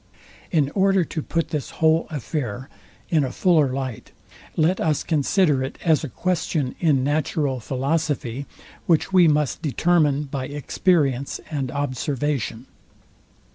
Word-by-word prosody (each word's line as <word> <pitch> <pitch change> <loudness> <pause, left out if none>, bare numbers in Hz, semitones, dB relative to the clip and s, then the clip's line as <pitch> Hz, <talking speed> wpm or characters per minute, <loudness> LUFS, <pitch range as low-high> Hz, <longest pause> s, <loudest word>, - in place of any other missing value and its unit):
In 145 -4 +1
order 195 -1 +3
to 155 - -4
put 165 +2 -2
this 150 -3 -3
whole 160 +1 +3
affair 135 -4 -4 0.4
in 155 -4 +3
a 130 - -2
fuller 155 -6 +3
light, 130 -4 -5 0.5
let 165 +4 +2
us 155 -3 +1
consider 150 -2 +2
it 135 - -5
as 160 -2 +3
a 150 - -4
question 160 -3 -1
in 145 -6 +2
natural 145 -2 0
philosophy, 135 0 -2 0.4
which 170 +3 +2
we 180 -3 +7
must 150 -3 +1
determine 150 -1 +2
by 135 -2 -4
experience 145 -2 0
and 140 -4 -2
observation. 140 -2 -2
150 Hz, 130 wpm, -23 LUFS, 135-165 Hz, 0.5 s, we